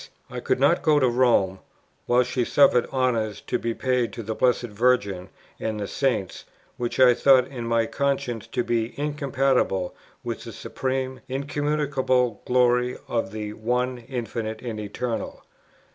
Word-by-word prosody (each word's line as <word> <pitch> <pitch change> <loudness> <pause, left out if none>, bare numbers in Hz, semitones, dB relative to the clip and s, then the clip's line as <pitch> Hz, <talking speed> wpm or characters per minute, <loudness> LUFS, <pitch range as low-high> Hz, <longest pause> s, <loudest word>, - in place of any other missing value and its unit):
I - - -4
could - - 0
not - - +4
go 150 -1 +4
to 130 - +3
Rome, 120 -6 +2 0.5
while 125 +1 +4
she 125 0 -1
suffered 125 -1 +4
honours 115 -6 0
to - - -2
be 115 -1 -2
paid 125 -2 0
to 115 - -6
the 110 +1 -3
Blessed 125 +2 +2
Virgin 105 -5 0 0.3
and 110 -1 -3
the 100 - -3
Saints 110 -8 -1 0.3
which 120 +1 -3
I 125 -1 +7
thought 130 +1 +5
in 120 -4 -6
my 115 -1 +2
conscience 135 -4 -2
to 125 - -1
be 115 +2 -2
incompatible 135 - 0 0.3
with - - -4
the - - -8
Supreme, 130 0 -3
Incommunicable 140 -3 0
Glory 125 0 +2
of 115 -5 -1
the 105 -1 -5
One 125 +3 -1
Infinite 115 -2 -5
and 115 -3 -4
Eternal; 110 +3 -3
7. - - -22
125 Hz, 155 wpm, -25 LUFS, 115-130 Hz, 0.5 s, I